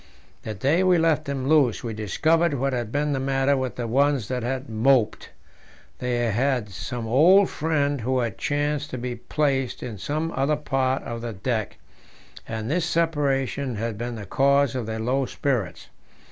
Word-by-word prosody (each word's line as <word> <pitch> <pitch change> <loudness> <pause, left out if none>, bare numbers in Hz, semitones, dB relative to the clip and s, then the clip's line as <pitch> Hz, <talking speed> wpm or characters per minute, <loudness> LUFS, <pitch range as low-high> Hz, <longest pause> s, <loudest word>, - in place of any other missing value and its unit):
The 110 - -5
day 140 - +2
we 185 -1 +4
let 160 -2 +2
them 135 -2 -3
loose 140 -7 +3
we 115 -2 -3
discovered 155 - +1
what 135 +1 -1
had 120 -3 -3
been 145 +2 0
the 135 - -1
matter 135 +1 +1
with 130 -2 -2
the 120 - -3
ones 135 -1 +1
that 125 -1 -2
had 130 +3 -3
moped: 115 +1 +2 0.7
they 125 -1 -1
had 125 -1 0
some 115 +5 -5
old 170 - +5
friend 145 -3 0
who 130 +3 0
had 115 -5 -2
chanced 145 0 -1
to 130 - -5
be 125 0 -4
placed 135 0 -1
in 110 -5 -6
some 155 - -2
other 140 +3 +1
part 135 -3 -1
of 115 0 -5
the 115 -1 -4
deck, 110 +2 -3 0.7
and 110 -1 -4
this 170 +1 +1
separation 140 -6 0
had 115 +1 -3
been 120 +2 -4
the 105 -3 -7
cause 140 +4 +3
of 125 -4 -3
their 110 0 -3
low 125 +4 0
spirits. 125 -9 -2
135 Hz, 175 wpm, -24 LUFS, 120-145 Hz, 0.7 s, old